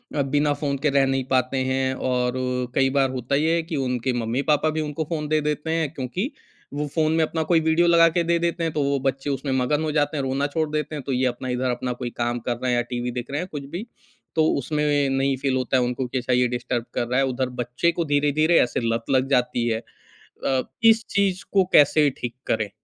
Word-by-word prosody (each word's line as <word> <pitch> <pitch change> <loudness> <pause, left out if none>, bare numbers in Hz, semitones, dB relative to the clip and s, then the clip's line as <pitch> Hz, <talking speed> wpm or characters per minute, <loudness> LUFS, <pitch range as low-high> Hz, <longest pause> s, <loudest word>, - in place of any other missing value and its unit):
अ, 145 - +2
बिना 145 +2 +1
फ़ोन 145 -1 -2
के 150 - +4
रह 135 - +5
नहीं 135 0 0
पाते 130 0 +1
हैं। 130 0 0 0.2
और 125 -1 +1 0.4
कई 135 0 +3
बार 135 -1 +3
होता 130 +1 -2
ये 160 +3 +2
है 170 - +1
कि - - 0
उनके 125 0 -1
मम्मी-पापा 140 +7 +1
भी 160 - 0
उनको 150 +1 -3
फ़ोन 155 -3 -2
दे 155 0 +1
देते 150 +1 -2
हैं, 160 -3 0
क्योंकि 165 - -3 0.4
वो 145 +1 -2
फ़ोन 155 -1 +2
में 165 - +3
अपना 160 +1 -2
कोई 165 - +6
वीडियो 160 +2 +2
लगा 170 -1 +6
के 170 - +3
दे 170 0 +2
देते 170 0 -1
हैं, 165 - 0
तो 150 - 0
वो 140 0 +1
बच्चे 135 +2 -5
उसमे 135 0 -2
मगन 150 +4 0
हो 155 - -1
जाते 150 0 0
हैं, 140 - -1
रोना 135 +2 0
छोड़ 155 +1 -1
देते 150 0 -2
हैं, 145 - -5
तो 135 - -4
ये 130 0 +1
अपना 125 +1 -2
इधर 125 +1 -1
अपना 125 +1 -3
कोई 120 - -2
काम 120 0 -1
कर 120 - -1
रहे 130 - 0
है - - +2
या 120 - +2
टीवी 120 0 -2
देख 125 +2 -6
रहे 145 - -1
हैं 180 - -5
कुछ 145 -2 -6
भी। 200 +6 -4 0.5
तो 160 -1 +4
उसमें 150 +3 -1 0.2
नहीं 135 0 +1
फ़ील 135 0 0
होता 130 0 +1
है 125 - +2
उनको 125 +1 -2
कि 125 - -3
अच्छा 125 0 -1
ये 125 0 +3
डिस्टर्ब 120 -1 -3
कर 120 - -1
रहा 125 +2 +1
है, 135 - +3
उधर 130 0 -1
बच्चे 125 +8 0
को 170 0 -2
धीरे-धीरे 150 +3 +3
ऐसे 120 - 0
लत 115 0 -3
लग 130 0 +2
जाती 125 -3 +1
है। 110 -1 0 0.7
अ, 130 -1 +2 0.2
इस 225 0 +6
चीज़ 195 -2 +1
को 195 -1 +5
कैसे 145 0 +6
ठीक 120 -1 -4
करें? 110 -2 0
140 Hz, 245 wpm, -23 LUFS, 125-155 Hz, 0.7 s, कोई